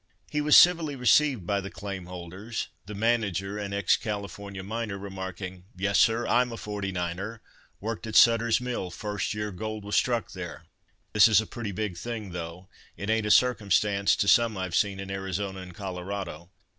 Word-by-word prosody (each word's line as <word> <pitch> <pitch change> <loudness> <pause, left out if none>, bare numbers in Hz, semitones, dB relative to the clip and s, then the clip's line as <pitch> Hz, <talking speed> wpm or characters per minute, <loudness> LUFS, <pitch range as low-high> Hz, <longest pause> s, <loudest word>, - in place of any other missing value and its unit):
He 150 - 0
was 150 0 +7
civilly 170 -5 +6
received 125 - +3
by 100 +1 0
the 100 - -6
claim 100 -3 -6
holders; 90 +5 -6 0.2
the 105 - -6
manager—an 100 -2 0
ex 100 -2 +2
Californian 100 -2 -5
miner—remarking, 95 -4 -5
"Yes, 100 +2 +2
sir, 115 +1 +4
I'm 125 0 +2
a 115 - -6
'forty 105 -2 -4
niner,'—worked 100 +4 -6
at 110 - -5
Suttor's 115 0 +6
Mill 125 -7 -3
first 105 +2 -3
year 105 0 -3
gold 110 +2 -5
was 105 - -2
struck 120 -2 +1
there. - - -7 0.5
This 105 +1 +8
is 110 -1 +5
a 110 - -1
pretty 110 -1 -5
big 95 -3 -3
thing, 110 0 -5
though 85 +1 -7 0.3
it 100 +5 -2
ain't 110 -1 +1
a - - -1
circumstance 105 -4 +3
to 100 - 0
some 115 0 +4
I've 95 -2 -3
seen 100 +1 +1
in 95 0 -6
Arizona 95 0 -3
and 90 -2 -10
Colorado. 95 -2 -5
100 Hz, 170 wpm, -27 LUFS, 95-115 Hz, 0.5 s, This